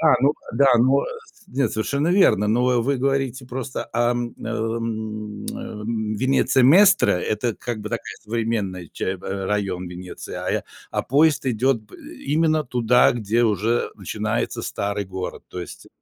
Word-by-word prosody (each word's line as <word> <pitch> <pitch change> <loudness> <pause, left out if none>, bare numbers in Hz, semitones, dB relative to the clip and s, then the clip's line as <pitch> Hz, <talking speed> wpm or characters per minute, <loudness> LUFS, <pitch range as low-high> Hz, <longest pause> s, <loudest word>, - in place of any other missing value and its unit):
Да, 155 -4 +5
ну 140 - +5 0.2
да, 135 -4 +5
ну 130 +4 +4 0.5
нет, 130 -3 0
совершенно 140 +8 0
верно. 175 - +4
Но 125 +2 +3
вы 140 +3 +1
говорите 135 -1 -1
просто 130 +1 -5
ам, 120 0 0
ам, 110 -2 -3
ам, 110 0 -4
Венеция 130 +2 +3
Местра- 195 +10 +6
это 105 +5 -1
как 120 -3 -4
бы 105 - -5
такая 115 0 -4
современная 105 -6 -2
ча 95 - -2
б 90 - -12 0.2
а - - -3
район 95 -3 -1
Венеции, 90 +1 -8
а - - -4
я - - -1 0.3
а - - 0
поезд 145 +1 +3
идёт 125 +1 +2
б 105 - -18
э, - - -12
именно 155 +1 +2
туда, 125 -1 +4
где 115 0 0
уже 110 +2 +1
начинается - - -2
старый 100 0 -2
город. 95 -1 -6
То 90 - -6
есть 85 - -9
115 Hz, 155 wpm, -23 LUFS, 105-135 Hz, 0.5 s, Местра